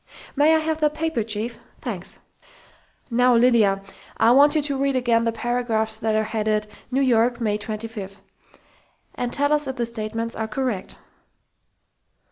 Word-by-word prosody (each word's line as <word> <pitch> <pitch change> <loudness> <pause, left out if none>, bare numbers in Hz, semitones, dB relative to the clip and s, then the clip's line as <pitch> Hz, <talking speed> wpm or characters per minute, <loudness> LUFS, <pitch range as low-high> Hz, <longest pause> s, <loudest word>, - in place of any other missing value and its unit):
"May 300 +3 +5
I - - +5
have 315 0 -1
that 300 -1 +1
paper, 320 -6 -1
chief?... 220 +2 -4 0.2
Thanks!... - - -5 0.9
Now, 245 +1 +4
Lydia, 225 -5 +4 0.3
I 230 - +5
want 285 +4 +6
you 305 - +2
to 285 -1 -2
read 275 0 0
again 235 -2 +2
the 230 - +2
paragraphs 230 -2 -1
that 220 -1 0
are 215 - +2
headed 215 -1 -1 0.2
'New 265 +2 +1
York, 240 -1 +2
May 210 -3 0
25 210 -2 -7 0.4
' - - -35
and 245 -1 -3
tell 285 +1 +2
us 295 -2 0
if 265 - -3
the 240 - -1
statements 230 0 -4
are 220 0 -3
correct." 220 -4 -3
235 Hz, 160 wpm, -23 LUFS, 220-265 Hz, 0.9 s, want